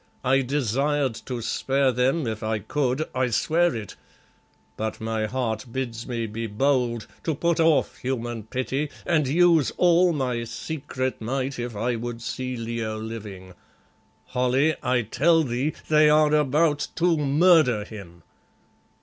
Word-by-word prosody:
I 135 Hz, +1 st, +3 dB
desired 135 Hz, +1 st, 0 dB
to 125 Hz, -2 st, -3 dB
spare 135 Hz, +3 st, +1 dB
them 130 Hz, +5 st, +1 dB
if 110 Hz, -1 st, -3 dB
I 110 Hz, 0 st, -1 dB
could, 130 Hz, +7 st, -1 dB
I 130 Hz, 0 st, +1 dB
swear 165 Hz, +8 st, +1 dB
it, 110 Hz, -4 st, -7 dB, 0.8 s
but 110 Hz, 0 st, -4 dB
my 110 Hz, -1 st, -2 dB
heart 110 Hz, -1 st, -2 dB
bids 120 Hz, -3 st, -4 dB
me 120 Hz, -2 st, -2 dB
be 115 Hz, +1 st, -4 dB
bold, 120 Hz, 0 st, 0 dB, 0.2 s
to 160 Hz, -, -1 dB
put 170 Hz, +3 st, 0 dB
off 160 Hz, -2 st, +3 dB
human 120 Hz, -3 st, -3 dB
pity, 130 Hz, +5 st, -2 dB, 0.2 s
and 155 Hz, -5 st, +2 dB
use 165 Hz, 0 st, +4 dB
all 175 Hz, 0 st, +4 dB
my 125 Hz, -6 st, -1 dB
secret 130 Hz, +1 st, -4 dB
might 130 Hz, +3 st, -2 dB
if 120 Hz, -2 st, -4 dB
I 120 Hz, +3 st, -1 dB
would 120 Hz, 0 st, -5 dB
see 130 Hz, +1 st, -4 dB
Leo 115 Hz, -1 st, -3 dB
living. 105 Hz, -4 st, -8 dB, 0.7 s
Holly, 130 Hz, +4 st, +1 dB
I 125 Hz, -2 st, +1 dB
tell 165 Hz, +9 st, +3 dB
thee 130 Hz, +3 st, -1 dB
they 155 Hz, -1 st, +5 dB
are 150 Hz, 0 st, +4 dB
about 150 Hz, +1 st, +2 dB
_to 170 Hz, 0 st, +2 dB
murder 145 Hz, -, +4 dB
him! 90 Hz, -6 st, -11 dB
130 Hz, 140 wpm, -25 LUFS, 115-150 Hz, 0.8 s, they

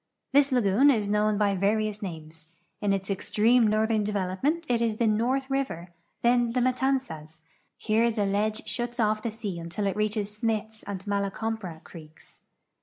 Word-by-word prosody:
This 280 Hz, 0 st, +5 dB
lagoon 245 Hz, +2 st, +4 dB
is 220 Hz, -7 st, +2 dB
known 210 Hz, +1 st, +2 dB
h}" 200 Hz, -2 st, +1 dB
vari 215 Hz, +2 st, +2 dB
ous 210 Hz, 0 st, -7 dB
names; 160 Hz, -4 st, -8 dB, 0.3 s
in 205 Hz, -1 st, +1 dB
its 195 Hz, 0 st, -1 dB
extreme 225 Hz, +4 st, +3 dB
northern 215 Hz, 0 st, +1 dB
development 205 Hz, -, -1 dB
it 235 Hz, -1 st, +1 dB
is 225 Hz, -2 st, 0 dB
the 235 Hz, -, +1 dB
North 240 Hz, +5 st, +1 dB
river, 265 Hz, -11 st, -3 dB, 0.3 s
then 240 Hz, -1 st, +3 dB
the 250 Hz, -, +1 dB
INIatanzas. 250 Hz, -, -1 dB, 0.4 s
Plere 225 Hz, +2 st, +2 dB
the 215 Hz, -3 st, -1 dB
ledge 210 Hz, +2 st, -1 dB
shuts 240 Hz, 0 st, -4 dB
off 215 Hz, -1 st, +2 dB
the 230 Hz, -, -2 dB
sea 210 Hz, -5 st, -5 dB
until 170 Hz, +5 st, -4 dB
it 195 Hz, -, 0 dB
reaches 210 Hz, -1 st, -1 dB
Smiths 220 Hz, 0 st, -2 dB
and 195 Hz, -1 st, -5 dB
Mala 200 Hz, -1 st, 0 dB
Compra 195 Hz, -6 st, -5 dB
creeks. 155 Hz, -2 st, -15 dB
215 Hz, 170 wpm, -27 LUFS, 195-235 Hz, 0.4 s, This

